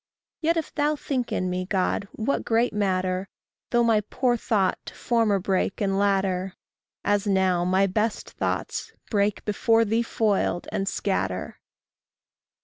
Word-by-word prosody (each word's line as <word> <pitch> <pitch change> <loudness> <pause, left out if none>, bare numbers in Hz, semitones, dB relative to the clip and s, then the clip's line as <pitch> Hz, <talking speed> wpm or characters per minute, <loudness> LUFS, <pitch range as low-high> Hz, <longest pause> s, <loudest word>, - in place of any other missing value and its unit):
Yet 335 +1 +2
if 320 - -3
thou 295 0 +1
think 260 -4 -3
in 185 - 0
me, 180 0 -2
God, 195 +1 0
what 230 +5 -1
great 230 +1 +1
matter 185 -2 0 0.4
Though 240 -1 +3
my 225 -2 +3
poor 250 -2 +1
thought 205 -5 +1
to - - -8
former 230 -4 +2
break 190 0 -1
and 195 -2 +1
latter 195 -2 +1 0.5
As 205 0 +1
now 190 -3 +2
my 190 +2 +3
best 210 +3 -1
thoughts; - - -3 0.2
break, 205 -1 +1
before 225 +2 +3
thee 225 +2 +1
foiled, 210 -6 0
and 195 - -2
scatter! 95 - -2
205 Hz, 140 wpm, -25 LUFS, 190-230 Hz, 0.5 s, Though